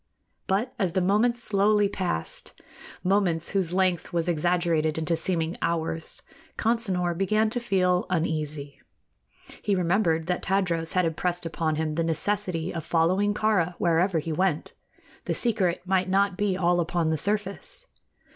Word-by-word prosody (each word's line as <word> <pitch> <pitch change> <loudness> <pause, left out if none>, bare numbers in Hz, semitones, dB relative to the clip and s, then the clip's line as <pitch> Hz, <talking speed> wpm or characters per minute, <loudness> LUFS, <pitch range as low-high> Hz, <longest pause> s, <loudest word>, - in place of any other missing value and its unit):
But 215 +7 0
as 185 -5 0
the 190 - +2
moments 225 +6 +2
slowly 205 0 +3
passed 185 - -4 0.4
moments 180 -4 +2
whose 190 -4 -1
length 185 -2 0
was 170 0 -1
exaggerated 170 -2 +1
into 160 +1 0
seeming 165 0 -1
hours 165 -1 -2 0.3
Consinor 190 -7 +1
began 215 +4 +1
to 245 - -1
feel 185 -6 +1
uneasy. 155 -5 -2 0.8
He 205 - +1
remembered 170 -2 +1
that 180 +1 -1
Tadros 175 -4 +1
had 185 -1 +2
impressed 175 +2 -1
upon 160 -1 -1
him 155 0 -1
the 165 +2 0
necessity 165 +1 -1
of 165 -2 -4
following 185 +6 +1
Kāra 195 -6 +1
wherever 175 +1 +2
he 160 +1 -2
went. 175 -2 0 0.5
The - - -1
secret 190 -7 +1
might 185 0 +1
not 195 0 +2
be 195 -1 0
all 175 -1 +2
upon 170 -1 0
the - - +1
surface. 210 - -3
180 Hz, 145 wpm, -26 LUFS, 165-195 Hz, 0.8 s, slowly